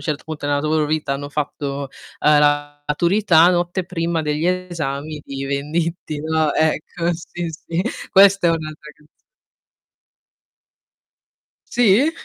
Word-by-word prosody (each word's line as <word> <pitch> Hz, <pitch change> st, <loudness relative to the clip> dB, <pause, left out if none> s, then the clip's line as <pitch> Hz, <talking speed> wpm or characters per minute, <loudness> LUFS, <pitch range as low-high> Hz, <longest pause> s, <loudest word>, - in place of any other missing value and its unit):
certo 150 Hz, 0 st, -3 dB
punto 155 Hz, -2 st, -5 dB
nella 145 Hz, 0 st, +1 dB
loro 155 Hz, 0 st, +1 dB
vita 155 Hz, -2 st, -1 dB
hanno 145 Hz, +1 st, -5 dB
fatto, 140 Hz, -1 st, -3 dB, 0.3 s
uhm, 150 Hz, 0 st, +5 dB
la 145 Hz, 0 st, +2 dB
maturità 170 Hz, +2 st, +4 dB
Notte 175 Hz, +1 st, -1 dB
prima 170 Hz, -2 st, -2 dB
degli 150 Hz, +2 st, -1 dB
esami 155 Hz, -5 st, -3 dB
di 135 Hz, 0 st, -5 dB
Venditti, 150 Hz, +3 st, -2 dB
no. 155 Hz, 0 st, +1 dB
Ecco, 160 Hz, +2 st, 0 dB
sì, 170 Hz, +1 st, -6 dB
sì, 165 Hz, +2 st, -3 dB, 0.3 s
questa 195 Hz, -1 st, +6 dB
è -, -, +5 dB
un'altra 155 Hz, -2 st, -5 dB
canz 150 Hz, -1 st, -26 dB, 2.6 s
Sì? 245 Hz, +5 st, +4 dB
155 Hz, 125 wpm, -20 LUFS, 145-170 Hz, 2.6 s, questa